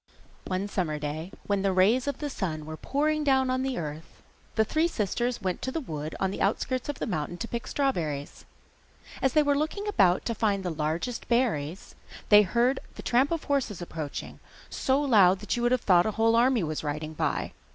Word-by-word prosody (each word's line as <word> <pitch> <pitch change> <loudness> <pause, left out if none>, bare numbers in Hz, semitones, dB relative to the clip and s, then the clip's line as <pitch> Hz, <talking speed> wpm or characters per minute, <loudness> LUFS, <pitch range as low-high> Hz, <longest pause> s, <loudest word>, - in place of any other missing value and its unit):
One 190 +2 -1
summer 175 -7 -1
day, 155 +4 -5
when 200 -1 0
the 195 0 +2
rays 210 +8 +3
of 285 - -1
the 295 - -4
sun 155 -9 -3
were 155 0 -6
pouring 300 - 0
down 265 -2 +3
on 255 0 0
the 265 -1 -2
earth, 155 0 -7 0.3
the 220 - +3
three 315 +8 +2
sisters 240 - -2
went 185 -2 -2
to 260 - -2
the 325 - -2
wood 155 - -5
on 190 -1 0
the - - -5
outskirts 255 +6 0
of 290 - -3
the - - -3
mountain 175 -4 -3
to 230 - -4
pick 235 0 -5
strawberries. 160 - -2 0.8
As 265 - +2
they 305 - +5
were 285 -1 +2
looking 315 +8 -2
about 190 - +3
to 230 - 0
find 205 -3 0
where 180 -2 -2
the - - -13
largest 165 +11 -2
berries 195 - 0 0.3
grew - - -20
they 210 0 +9
heard 240 +6 +2 0.2
the - - -9
tramp 255 +4 +3
of 335 -2 -2
horses 270 -9 -1
approaching, 160 -4 -6 0.3
so 265 +1 +1
loud 205 -10 +5
that 210 - -2
you 240 - -2
would 240 0 +2
have 255 -1 +2
thought 180 0 +4
a - - 0
whole 225 +1 +4
army 240 -2 +3
was 155 -1 -3
riding 155 +1 -3
by. - - -1
210 Hz, 215 wpm, -27 LUFS, 170-260 Hz, 0.8 s, they